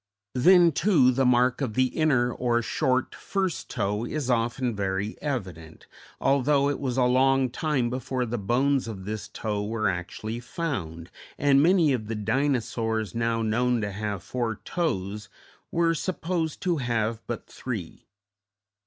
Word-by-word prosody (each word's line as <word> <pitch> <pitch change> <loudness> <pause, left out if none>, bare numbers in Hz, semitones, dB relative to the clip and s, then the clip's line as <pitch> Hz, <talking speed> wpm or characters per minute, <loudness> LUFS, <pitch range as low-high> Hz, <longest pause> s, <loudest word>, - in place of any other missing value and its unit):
Then, 170 +6 +6
too, 150 -6 +4
the 130 0 +2
mark 125 +2 +3
of 120 -6 -2
the 130 - +4
inner, 130 -6 +2
or 120 -1 0
short 130 +2 0
first, 190 -4 -3
toe, 105 +3 -1
is 135 0 -2
often 120 0 0
very 100 +1 -2
evident, 90 - -5 0.3
although 140 +1 +3
it 145 - -4
was 130 -3 -2
a 130 - +4
long 130 +1 +3
time 130 -4 0
before 130 0 -2
the 120 0 -3
bones 130 +6 +1
of 95 -4 -7
this 110 0 -4
toe 105 -2 -3
were 110 0 -1
actually 95 +5 -3
found, 95 - -4 0.3
and 140 -1 +4
many 165 -3 +4
of 110 -4 -3
the 115 - -3
Dinosaurs 115 -3 -1
now 115 -1 0
known 120 +2 +1
to 105 -1 -2
have 100 -2 -4
four 120 -2 -2
toes 105 - -2 0.4
were 165 0 +2
supposed 165 -2 -2
to 175 -3 +1
have 115 -3 -1
but 120 - -4
three. 110 -10 -7
125 Hz, 150 wpm, -26 LUFS, 110-140 Hz, 0.4 s, Then